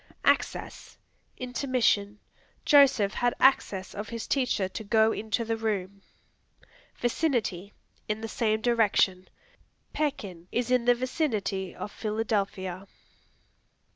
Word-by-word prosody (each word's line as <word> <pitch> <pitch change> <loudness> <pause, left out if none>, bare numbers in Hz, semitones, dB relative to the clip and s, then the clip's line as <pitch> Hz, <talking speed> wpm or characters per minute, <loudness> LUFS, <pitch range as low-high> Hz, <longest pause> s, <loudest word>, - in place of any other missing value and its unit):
Access - - 0 0.4
Intermission; 250 -5 0 0.5
"Joseph 270 -8 +5
had 245 0 0
access 205 -7 +2
of 210 +1 -6
his 230 -1 -5
teacher 250 -8 0
to 220 - -7
go 220 +1 +3
into 220 +2 -2
the 225 0 -1
room." 200 -3 -3 1.0
Vicinity 235 - -1 0.4
In 215 +1 -2
the 225 - -4
same 220 -1 0
direction; 210 -6 +2 0.6
"Pekin 200 - -3
is 245 +1 -1
in 250 -2 +3
the 245 0 +5
vicinity 225 - -2
of 210 - -6
Philadelphia." 200 -3 -2
220 Hz, 105 wpm, -28 LUFS, 200-245 Hz, 1.0 s, Joseph